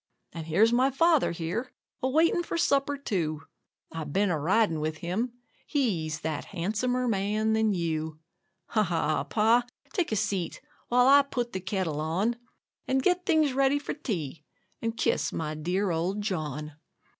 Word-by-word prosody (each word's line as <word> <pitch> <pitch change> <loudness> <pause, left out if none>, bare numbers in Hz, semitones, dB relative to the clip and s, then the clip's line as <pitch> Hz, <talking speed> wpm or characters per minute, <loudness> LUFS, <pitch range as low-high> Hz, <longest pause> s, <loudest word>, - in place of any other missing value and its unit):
And 165 -2 -6
here's 215 +9 +4
my 255 +3 +4
father 320 +2 +3
here, 170 +9 -3 0.3
a 260 - +1
waiting 325 +5 +3
for 340 - -3
supper, 285 -3 +2
too; 165 - -2 0.5
I've 160 -3 -5
been 200 +3 +2
a 160 - 0
riding 180 +1 +2
with 155 +1 -2
him 200 +8 -2 0.3
he's 170 - -1
that 155 -2 -3
"handsomer 220 +7 -1
man 215 +1 +1
than 220 -1 +2
you." 160 -4 -2 0.5
Ha! 220 - +2
ha! 165 -5 0
Pa, 225 +3 +3 0.3
take 360 - 0
a - - +1
seat, 195 -4 -1 0.3
while 245 +1 +4
I 280 +1 +8
put 245 -4 -3
the 190 - -2
kettle 185 -5 -2
on, 190 +10 0 0.5
And 265 0 +1
get 360 +2 +1
things 310 -4 +3
ready 270 +1 +3
for 285 - -4
tea, 165 - -4 0.4
and 230 0 -2
kiss - - +1
my 155 -1 -3
dear 180 +5 -1
old 180 +5 -1
John. 155 -6 -3
205 Hz, 160 wpm, -28 LUFS, 165-255 Hz, 0.5 s, I